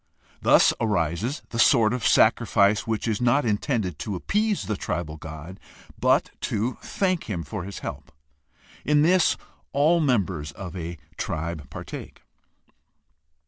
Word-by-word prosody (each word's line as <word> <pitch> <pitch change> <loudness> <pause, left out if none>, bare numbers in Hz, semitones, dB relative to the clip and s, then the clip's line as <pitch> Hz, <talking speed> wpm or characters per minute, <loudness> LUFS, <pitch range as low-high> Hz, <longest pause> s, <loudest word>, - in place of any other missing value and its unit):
Thus - - +5
arises 105 - -1
the 115 - -4
sort 115 -2 +5
of 125 - 0
sacrifice 110 -2 +3
which 110 0 -1
is 110 -1 -1
not 125 +3 +3
intended 105 - -1
to 105 - -3
appease 210 - 0
the 105 - -1
tribal 80 -4 -3
god, 80 +4 -9 0.4
but - - +3 0.2
to 115 +5 -1
thank 185 -3 -1
him 90 -6 -3
for 80 +4 -6
his 100 -1 -7
help. - - -7 0.7
In 150 0 +3
this 180 +1 +4 0.4
all 155 +5 +4
members 95 - 0
of 95 0 -8
a 85 -1 -5 0.2
tribe 80 -3 -4
partake. - - -9
105 Hz, 135 wpm, -25 LUFS, 85-125 Hz, 0.7 s, Thus